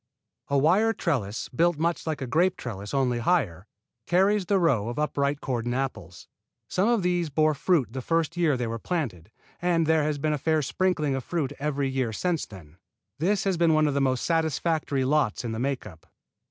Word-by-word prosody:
A 140 - +1
wire 190 +11 +3
trellis, 120 - -2
built 170 +4 +1
much 165 +1 -1
like 155 -3 -2
a - - -2
grape 175 +9 +2
trellis, 100 -4 -6
only 130 -3 +1
higher, 110 - 0 0.4
carries 195 +2 +2
the 200 - +3
row 130 - +2
of 120 - -6
upright 145 -1 0
cordon 120 -2 -2
apples. 110 -10 -5 0.4
Some 195 +5 +1
of 235 -5 +2
these 175 -2 0
bore 155 +2 +2
fruit 140 - +1
the 130 - -4
first 165 +4 0
year 165 -6 +2
they 125 - -2
were 115 0 -4
planted, 110 - -3 0.3
and 170 -2 +2
there 160 0 +3
has 150 0 -1
been 150 +2 0
a 150 - -2
fair 155 +1 +1
sprinkling 155 -2 0
of 135 -1 -3
fruit 145 -4 -2
every 145 -1 -1
year 130 -3 -1
since 175 - -1
then. 85 -5 -13 0.4
This 195 +6 +1
has 195 -3 0
been 165 -2 +3
one 155 0 +4
of 145 - +1
the 140 - +1
most 130 -2 +1
satisfactory 160 -3 0
lots 140 -6 +1
in 115 - -2
the 110 - -4
make 135 +1 -2
up. 80 -6 -13
150 Hz, 200 wpm, -26 LUFS, 125-170 Hz, 0.4 s, one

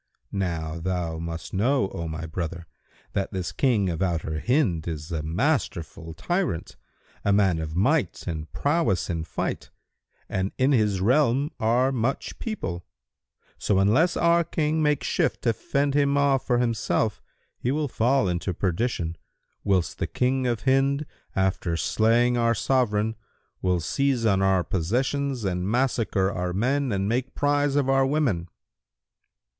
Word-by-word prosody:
Now 85 -4 -2
thou 85 -2 -2
must 85 0 -6
know, 105 +1 +2
O 85 - -4
my 80 +1 -5
brother, 85 +1 -5 0.5
that 95 - -1
this 95 -4 -3
King 115 -8 +2
of 85 -3 -2
Outer 80 -4 -1
Hind 115 - +1
is 80 0 -5
a 80 -2 -1
masterful 85 - -2
tyrant, 175 - -2 0.5
a 100 - +2
man 95 -4 +3
of 80 0 -4
might 130 - +1
and 80 -3 -5
prowess 145 - 0
in 85 -1 -2
fight, - - -4 0.6
and 95 +1 -2
in 130 +2 +3
his 105 -7 +2
realm 135 +5 +3
are 120 +4 +2
much 130 +1 -2
people; 90 - -4 0.8
so 100 - +1
unless 125 - +3
our 170 0 +4
King 155 -1 0
make 150 -3 +2
shift - - 0
to 115 - +3
fend 140 +5 -1
him 140 0 +2
off 140 -2 +2
from 120 -1 +2
himself, 115 -4 0 0.4
he 120 - -1
will 150 +2 0
fall 125 -2 +2
into 90 0 -2
perdition, 90 -3 -1 0.5
whilst 95 -4 0
the - - -1
King 130 0 0
of 120 -3 -1
Hind, 135 +2 +2 0.3
after 95 -3 0
slaying 120 +6 +2
our 115 0 +3
Sovran, 110 -2 +1 0.5
will 90 -1 +1
seize 135 - 0
on 100 -3 +3
our 95 -2 +3
possessions 125 - -1
and 90 0 -1
massacre 115 -5 +1
our 90 -1 -2
men 130 +6 +1
and 100 -1 0
make 125 +4 -1
prize 145 0 +1
of 145 -2 +2
our 135 0 +4
women." 130 - 0
110 Hz, 150 wpm, -25 LUFS, 90-135 Hz, 0.8 s, our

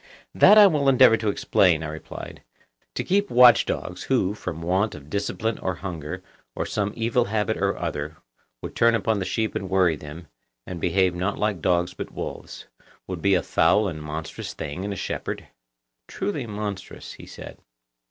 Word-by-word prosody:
That 210 - +7
I 210 - +10
will 150 -7 +3
endeavour 130 -3 +6
to 110 -1 -1
explain, 90 -5 +2
I - - -3
replied. 80 +1 -9 0.5
To - - -1
keep 200 +2 +1
watch 125 0 +7
dogs, 90 +1 -4
who, 110 -7 +1
from 85 -5 -6
want 95 +5 0
of 75 0 -13
discipline 100 +2 -2
or 95 -1 -2
hunger, 85 -5 -6 0.3
or - - -2
some 105 -1 -2
evil 115 +1 +1
habit 110 +1 -1
or 100 0 0
other, 75 -2 -4 0.5
would - - -7
turn 115 0 +4
upon 110 -1 0
the 95 - -2
sheep 110 +1 -1
and 95 - -4
worry 95 -4 +3
them, 75 +3 -10 0.4
and 90 -2 -7
behave 90 +1 +2
not 90 +3 -2
like 105 -5 -1
dogs 90 0 +1
but - - -6
wolves, - - -7 0.4
would 90 -3 -6
be 100 -1 +3
a 90 - +1
foul 105 0 +3
and 80 -4 -5
monstrous 75 +1 -6
thing 80 +3 -5
in 100 - -3
a - - -3
shepherd? - - -5 0.6
Truly 190 - -3
monstrous, 105 -2 -6
he - - -13
said. - - -10
95 Hz, 180 wpm, -24 LUFS, 85-110 Hz, 0.6 s, I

